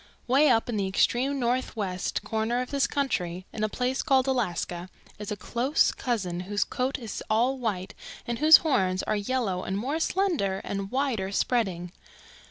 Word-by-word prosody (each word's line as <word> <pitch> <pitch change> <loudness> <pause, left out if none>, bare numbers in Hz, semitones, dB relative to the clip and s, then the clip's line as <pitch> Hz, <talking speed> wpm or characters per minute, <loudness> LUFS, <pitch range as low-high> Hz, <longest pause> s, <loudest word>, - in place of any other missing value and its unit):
"Way 275 +4 +4
up 225 -3 +3
in 235 -3 -2
the 195 -1 0
extreme 255 +8 +1
northwest 230 -7 -2
corner 225 +2 -1
of 250 - -4
this 275 -3 +2
country, 185 -11 -2
in 215 - -3
a 215 - +1
place 250 +4 -1
called 265 -4 +3
Alaska, 185 -8 -2 0.3
is 210 -1 -6
a - - -1
close 240 - +1
cousin 195 -8 -2
whose 205 +3 -1
coat 255 +3 -2
is 230 -6 -6
all 245 +5 +2
white 200 -6 -3 0.3
and 235 -1 -3
whose 310 +2 +9
horns 185 -11 +1
are - - 0
yellow 205 -3 -1
and 190 - -2
more 275 +9 -2
slender 325 - 0
and 195 -1 -4
wider 245 -7 -1
spreading. 190 -6 0
230 Hz, 170 wpm, -27 LUFS, 195-260 Hz, 0.3 s, whose